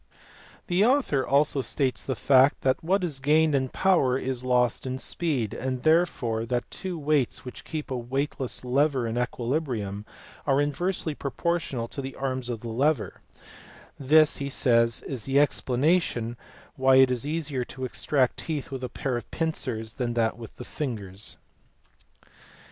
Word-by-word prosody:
The 180 +3 +2
author 240 - +2
also 140 0 +2
states 130 0 -1
the 130 - -2
fact 130 +4 +4
that 130 +2 +1
what 190 +3 +1
is 155 -6 -2
gained 155 +3 +3
in 130 -2 +1
power 140 -9 +2
is 130 -2 -3
lost 125 -1 +1
in 130 0 -2
speed, 135 - -2
and 130 -1 -3
therefore 155 -9 +2
that 120 0 -2
two 185 -2 -5
weights 145 -5 0
which 125 - -8
keep 155 -3 -5
a - - 0
[weightless] 130 +1 -3
lever 135 0 +2
in 115 0 -3
equilibrium 120 -4 -2 0.4
are 135 -1 +3
inversely 155 +3 -1
pro 140 - -4
portional 160 -8 -2
to 140 - -4
the 135 0 -6
arms 130 -2 -3
of 115 -3 -4
the 120 - -6
lever; 140 +7 0 0.8
this, 155 +3 +5
he 140 0 -3
says, 115 -4 +2
is 130 -6 -5
the 135 +1 +3
explanation 135 -3 +1 0.4
why 130 0 +4
it 130 -1 +6
is 125 +3 -1
easier 150 -5 -1
to 130 +1 -6
extract 130 0 0
teeth 150 -4 -4
with 130 -1 -5
a 125 - -3
pair 130 0 -2
of 120 -1 -8
pincers 125 -9 -3
than 120 -2 -2 0.2
with 115 -2 -11
the - - -9
fingers. 105 -8 -5
135 Hz, 160 wpm, -26 LUFS, 125-150 Hz, 0.8 s, it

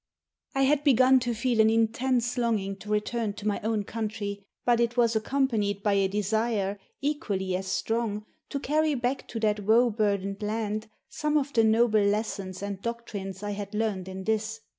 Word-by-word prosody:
I 270 - +3
had 285 +1 +3
begun 260 -2 +6
to 240 -1 -2
feel 235 0 +2
an 220 - +5
intense 235 +2 +1
longing 220 -5 0
to 210 - -11
return 210 +1 -1
to 210 0 -6
my 205 - 0
own 220 -1 0
country, 210 -2 -4 0.2
but 240 -1 +4
it 235 +1 +1
was 235 -2 +3
accompanied 220 -4 0
by 205 - +2
a 195 -1 +3
desire, 205 0 0 0.2
equally 205 - -1
as 190 +1 -3
strong, 220 0 -1 0.2
to 280 - -2
carry 305 +2 +1
back 250 +1 -2
to 230 - -5
that 210 -1 +2
woe 230 +4 +4
burdened 200 -2 -1
land 215 0 -2 0.2
some 300 0 0
of 285 -1 -1
the 225 - +4
noble 220 0 +4
lessons 200 -2 -1
and 200 -1 -4
doctrines 205 -5 -5
I 205 - -2
had 205 0 -5
learned 210 -4 -1
in 190 0 -6
this. 220 +1 -1
220 Hz, 180 wpm, -27 LUFS, 205-240 Hz, 0.2 s, begun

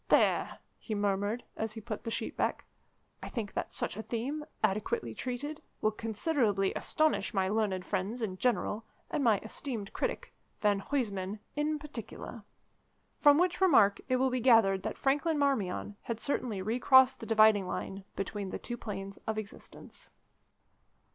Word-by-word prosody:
"There," - - +3 0.2
he 220 - -4
murmured, 205 +3 0
as 220 -1 -3
he 225 - -6
put 220 -1 -6
the - - -1
sheet - - -3
back; - - -1 0.6
"I - - -6
think 220 -5 -4
that - - -3
such - - -2
a 220 - -4
theme, 255 +7 -3 0.2
adequately 195 - 0
treated, 285 - -4 0.2
will 215 - +2
considerably 215 -2 0
astonish 310 -7 +1
my 190 -1 +2
learned 200 -3 0
friends 205 +6 -2
in 185 -3 -3
general, 230 -2 0 0.3
and 290 - 0
my 225 -4 +5
esteemed 220 -2 -4
critic, - - -3 0.3
Van 205 -2 +3
Huysman, 200 -5 -2 0.2
in 300 +1 0
particular." 245 -5 -7 0.8
From 290 0 +7
which 360 +2 +1
remark 225 - +5
it 255 - +3
will 260 +1 +2
be 255 - 0
gathered 225 -6 +5
that - - -4
Franklin 295 +4 +1
Marmion 210 -8 0
had 230 -2 -4
certainly 230 -6 -1
recrossed 260 +4 +5
the 225 - -7
dividing 215 -3 +5
line 195 +1 -4
between 195 0 -3
the - - -4
two 240 - -6
Planes 195 -3 -6
of 220 0 -1
Existence. 215 -1 -10
220 Hz, 155 wpm, -31 LUFS, 200-260 Hz, 0.8 s, From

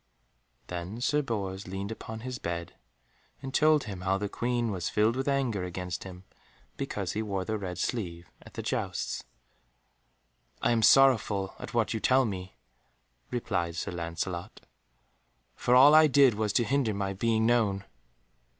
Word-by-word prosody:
Then 90 +5 -6
Sir 150 +4 +2
Bors 100 -7 -4
leaned 95 +3 -4
upon 110 0 -7
his 125 0 -5
bed, 85 0 -4 0.7
and 135 0 -7
told 155 0 +4
him 100 -4 -7
how 95 +1 +1
the 105 +1 -2
Queen 120 +1 -1
was 90 -4 -2
filled 110 +2 +2
with 135 +1 -2
anger 130 -8 0
against 90 -1 -5
him, 90 -1 -10 0.5
because - - -3
he 110 - -2
wore 100 -3 -3
the 110 - -2
red 95 -4 -5
sleeve 85 -7 -3
at - - -15
the - - -4
jousts. - - -2 1.4
"I - - +1
am 115 -1 +2
sorrowful 110 -6 +4
at - - -8
what 115 -1 +1
you 110 - -2
tell 130 +3 +3
me," 95 -3 -5 0.7
replied 90 -9 -2
Sir 85 - -3
Lancelot, 85 +1 -5 0.9
"for 125 - +2
all 140 +4 +8
I 155 0 +8
did 140 -3 +5
was 105 0 -1
to 120 - +3
hinder 120 -3 0
my 100 -1 -2
being 110 +2 +1
known." 105 -5 +2
105 Hz, 160 wpm, -29 LUFS, 95-120 Hz, 1.4 s, all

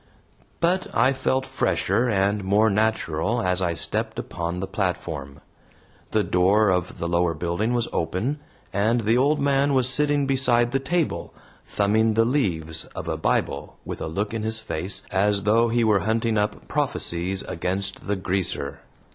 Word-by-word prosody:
But 180 +3 +1
I 130 +4 +4
felt 130 0 0
fresher 125 +1 0
and 100 0 +1
more 105 +3 +3
natural 110 -1 0
as 90 0 +1
I 85 -2 0
stepped - - -1
upon 85 +1 -4
the 95 - -2
platform. 90 -8 -4 0.7
The 110 -1 +1
door 95 +3 +3
of 90 -1 -1
the 85 - -3
lower 85 -1 +1
building 90 +9 -1
was 120 -2 +1
open, 105 - -1 0.3
and 110 +4 +2
the 110 +2 +2
old 145 +4 +3
man 140 0 +2
was 130 -2 +4
sitting 145 +1 +2
beside 125 -3 +3
the 135 - +1
table, 165 +4 -2 0.3
thumbing 110 +2 +2
the 115 0 +4
leaves 85 - 0
of - - -6
a - - -1
Bible - - -1
with - - -6
a - - -3
look 100 +7 -3
in 115 - -2
his 110 +1 0
face 95 -2 -1
as 100 0 +2
though 115 +3 +3
he 120 +1 +1
were 105 -3 +3
hunting 110 +2 0
up 105 0 -1
prophecies 90 +3 -1
against 95 +4 -3
the 105 - +1
"Greaser." 90 -7 -2
105 Hz, 165 wpm, -24 LUFS, 90-120 Hz, 0.7 s, I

